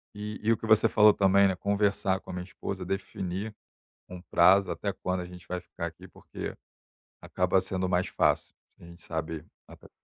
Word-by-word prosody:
E 105 Hz, +1 st, -6 dB
e 110 Hz, -, +3 dB
o 115 Hz, -, +3 dB
que -, -, -7 dB
você 110 Hz, -1 st, +5 dB
falou 105 Hz, 0 st, +6 dB
também, 100 Hz, 0 st, +4 dB
né, 95 Hz, -, 0 dB
conversar 100 Hz, -1 st, +1 dB
com 95 Hz, -, -10 dB
a -, -, -7 dB
minha 90 Hz, 0 st, -4 dB
esposa, 95 Hz, 0 st, -6 dB
definir 95 Hz, +2 st, -4 dB, 0.5 s
um 90 Hz, -1 st, -8 dB
prazo 95 Hz, +1 st, +4 dB
até 100 Hz, -1 st, -3 dB
quando 90 Hz, 0 st, -2 dB
a -, -, -6 dB
gente 90 Hz, 0 st, -12 dB
vai 90 Hz, 0 st, -3 dB
ficar 85 Hz, -1 st, -7 dB
aqui. 85 Hz, +3 st, -11 dB
Porque -, -, -8 dB, 0.7 s
acaba 90 Hz, +1 st, +1 dB
sendo 95 Hz, 0 st, -2 dB
mais 90 Hz, 0 st, +1 dB
fácil, -, -, +1 dB, 0.2 s
se -, -, -19 dB
a 85 Hz, -, -12 dB
gente 85 Hz, +1 st, -14 dB
sabe 80 Hz, -1 st, -4 dB, 0.2 s
até -, -, -15 dB
quando -, -, -32 dB
95 Hz, 205 wpm, -28 LUFS, 90-100 Hz, 0.7 s, falou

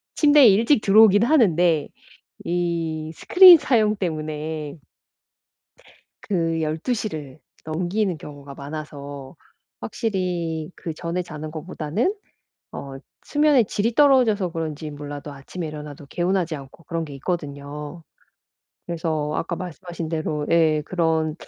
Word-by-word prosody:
침대에 290 Hz, -3 st, +6 dB
일찍 225 Hz, +5 st, +4 dB
들어오긴 205 Hz, +1 st, +6 dB
하는데 175 Hz, -, +3 dB, 0.5 s
이 165 Hz, -3 st, -2 dB
스크린 360 Hz, -2 st, +8 dB
사용 215 Hz, -7 st, +2 dB
때문에 155 Hz, -3 st, -4 dB, 1.5 s
그 165 Hz, -4 st, -1 dB
12:00 205 Hz, +9 st, -2 dB
를 150 Hz, -3 st, -8 dB, 0.3 s
넘기는 180 Hz, +3 st, -1 dB
경우가 145 Hz, -1 st, -10 dB
많아서 145 Hz, -1 st, -8 dB, 0.5 s
확실히 175 Hz, -6 st, -3 dB
그전에 170 Hz, +2 st, -4 dB
자는 155 Hz, -2 st, -8 dB
것보다는 165 Hz, -, -2 dB, 0.6 s
어 135 Hz, -1 st, -7 dB, 0.3 s
수면의 290 Hz, -6 st, +3 dB
질이 220 Hz, +4 st, -1 dB
떨어져서 245 Hz, -10 st, +4 dB
그런지 155 Hz, -2 st, -4 dB
몰라도 145 Hz, 0 st, -7 dB
아침에 155 Hz, +5 st, -7 dB
일어나도 150 Hz, -1 st, -9 dB
개운하지 175 Hz, 0 st, -1 dB
않고 140 Hz, +4 st, -12 dB
그런 165 Hz, -2 st, -3 dB
게 145 Hz, -, -9 dB
있거든요. 145 Hz, 0 st, -5 dB, 0.8 s
그래서 160 Hz, -3 st, -2 dB
아까 170 Hz, +1 st, -2 dB
말씀하신 175 Hz, -2 st, -6 dB
대로 155 Hz, -2 st, -2 dB
예 160 Hz, -2 st, +3 dB
그런 160 Hz, -3 st, 0 dB
165 Hz, 265 characters per minute, -23 LUFS, 150-190 Hz, 1.5 s, 스크린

